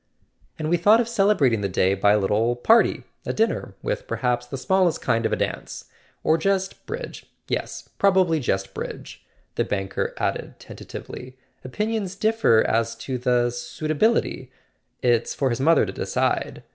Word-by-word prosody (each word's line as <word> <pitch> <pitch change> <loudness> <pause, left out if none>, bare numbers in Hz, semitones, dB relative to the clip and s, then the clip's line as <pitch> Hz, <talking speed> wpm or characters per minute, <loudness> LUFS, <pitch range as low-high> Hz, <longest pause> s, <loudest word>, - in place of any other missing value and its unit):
"And 155 - -3
we 175 - +4
thought 210 +7 +5
of 235 - 0
celebrating 195 - +2
the 100 - -1
day 95 +1 +2
by 100 +1 +3
a - - +4
little 105 +4 +1
party—a 225 - +1
dinner, 225 +1 -1
with - - -3
perhaps 125 -1 -1
the 135 - -5
smallest 180 +4 +2
kind 115 0 +1
of - - -7
a - - +2
dance: - - -4 0.4
or 160 +1 +3
just 195 +2 -1
bridge—yes, 485 +3 -6
probably 185 -5 +3
just 95 -7 -2
bridge," - - -7 0.3
the - - 0
banker 95 -1 -3
added - - -2
tentatively. 130 +1 -9 0.3
"Opinions 210 - -2
differ 215 - +3
as 115 0 0
to 130 -2 -5
the 120 -1 +2
suitability—it's 130 - -2
for 135 -2 0
his 120 - -2
mother 160 +2 +4
to - - -6
decide. - - -1
135 Hz, 145 wpm, -24 LUFS, 120-195 Hz, 0.4 s, thought